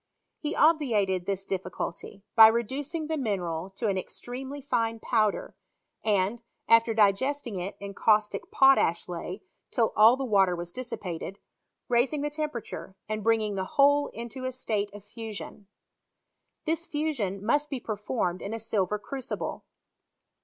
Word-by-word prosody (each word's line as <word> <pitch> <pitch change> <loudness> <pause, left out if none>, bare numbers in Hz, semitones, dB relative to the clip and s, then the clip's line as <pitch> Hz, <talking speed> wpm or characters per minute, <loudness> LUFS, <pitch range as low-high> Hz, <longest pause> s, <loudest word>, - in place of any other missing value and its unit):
He 300 - -3
obviated 215 - +3
this 195 -1 -2
difGculty 190 0 -5
by 220 -1 +11
reducing 265 +8 -1
the 315 0 -2
mineral 180 -7 -2
to 230 - -3
an 195 -2 +1
ex - - -7
tremely 265 +3 -6
fine 230 -3 0
powder, 215 -3 0 0.5
and, 210 +2 +1 0.3
after 230 0 +5
digesting 220 +2 +2
it 185 +3 -5
in 200 0 -7
caustic 215 - +2
potash 270 - +4
icy 180 +3 -6 0.3
till 230 -2 +1
all 225 +4 +7
the 270 - -2
water 195 -6 +3
was 175 0 -6
dissipated, 195 -6 -5 0.5
raising 255 +5 +2
the 295 - -1
temperature, 295 -10 -5
and 215 -1 -3
bringing 220 -2 +2
the 190 -1 -1
whole 285 +1 +5
into 235 +2 -7
a 255 - -1
state 215 -5 -2
of 205 0 -11
fusion. 210 -2 -7 1.0
This 330 +1 -1
fusion 235 -11 -2
must 295 +6 +2
be 270 - -3
performed 210 -4 -2
in 200 - -4
asilver 210 -3 -1
crucible. 265 +3 -5
225 Hz, 140 wpm, -28 LUFS, 200-265 Hz, 1.0 s, by